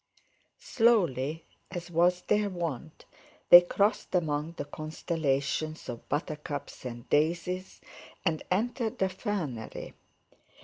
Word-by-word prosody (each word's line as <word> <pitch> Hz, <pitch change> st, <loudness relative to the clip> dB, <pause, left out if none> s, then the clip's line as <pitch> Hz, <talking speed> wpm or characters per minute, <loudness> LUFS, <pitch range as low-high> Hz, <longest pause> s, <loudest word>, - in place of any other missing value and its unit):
Slowly, 170 Hz, -, +2 dB, 0.2 s
as 175 Hz, -1 st, -6 dB
was 175 Hz, +2 st, +3 dB
their 210 Hz, -1 st, +2 dB
wont, 160 Hz, -4 st, -5 dB, 0.5 s
they 175 Hz, -, +13 dB
crossed 200 Hz, +3 st, 0 dB
among 155 Hz, -2 st, 0 dB
the 145 Hz, -, -5 dB
constellations 155 Hz, 0 st, -2 dB
of 120 Hz, -2 st, -7 dB
buttercups 150 Hz, -2 st, -4 dB
and 120 Hz, -1 st, -7 dB
daisies, 175 Hz, +5 st, 0 dB, 0.4 s
and 160 Hz, -1 st, +1 dB
entered 225 Hz, +4 st, -1 dB
the 190 Hz, -, +1 dB
fernery. 180 Hz, -, -4 dB
165 Hz, 100 wpm, -29 LUFS, 145-185 Hz, 0.5 s, they